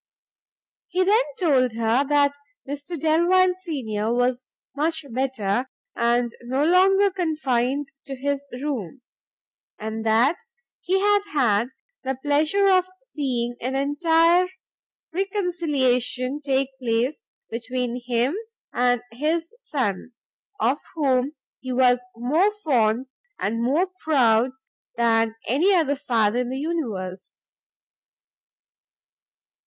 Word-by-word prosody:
He 370 +1 +1
then 425 +6 +4 0.2
told 265 - +3
her 230 +3 +2
that 285 -1 +3 0.3
Mr 290 +4 -5
Delvile 345 +4 +4
senior 225 - -2
was 245 +1 0 0.3
much 315 +1 -1
better, 250 -2 -1 0.3
and 235 0 +1
no 260 +4 0
longer 385 +3 +4
confined 290 -6 0 0.2
to 270 - -5
his 280 +1 -2
room: 255 - -5 0.7
and 220 +1 -5
that 230 +8 +3 0.4
he 380 +2 +1
had 410 +1 +3
had 235 -5 +2 0.4
the 265 -1 -2
pleasure 310 +8 +2
of 370 -1 +3
seeing 255 - -2
an 255 +2 -2
entire 330 +5 +3 0.7
reconciliation 295 - 0
take 270 -1 +1
place 240 - 0 0.3
between 245 +1 -3
him 245 +5 0 0.4
and 245 -1 +2
his 315 +7 -1
son, 255 - -3 0.5
of 270 -1 +1 0.2
whom 275 -2 +1 0.3
he 260 - -6
was 250 -1 +3
more 305 - +2
fond 245 -3 +2 0.3
and 230 +3 -1
more 285 +10 +2 0.2
proud 245 -5 +3 0.5
than 225 -1 +2
any 345 - +3
other 310 -5 +2
father 235 -5 +1
in 250 -1 -1
the 260 - -3
universe. 220 - -4
265 Hz, 105 wpm, -24 LUFS, 240-320 Hz, 0.7 s, then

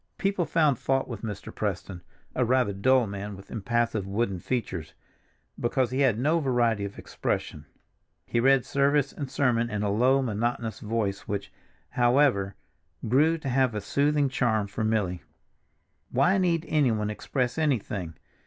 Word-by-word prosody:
People 195 -3 0
found 150 -7 +2
fault 135 0 0
with 115 -5 -6
Mr. 105 -3 -6
Preston—a 95 +4 -4
rather 125 -3 +2
dull 125 +5 +3
man 100 0 -6
with 95 - -14
impassive 115 -1 -1
wooden 100 -2 -1
features—because 120 - -4
he 130 - -1
had 130 -6 +3
no 155 +7 +2
variety 120 -7 +1
of 100 - -8
expression; - - -4 0.6
he 120 - 0
read 135 +1 +4
service 140 0 +2
and 140 -3 -5
sermon 120 -4 +1
in 105 -1 -2
a 100 - 0
low 130 +6 +3
monotonous 115 0 -2
voice 105 -3 -2
which, 100 0 -4 0.4
however, 120 -5 +3 0.5
grew 150 +8 +3
to 150 -4 -5
have 130 -2 +2
a - - 0
soothing 145 +6 +1
charm 115 -5 +1
for 100 +2 -4
Milly. 100 -6 0 0.9
Why 190 +2 +3
need 170 -3 +1
anyone 115 -9 +1
express 125 +5 -2
anything? 105 - -1
120 Hz, 145 wpm, -27 LUFS, 105-135 Hz, 0.9 s, read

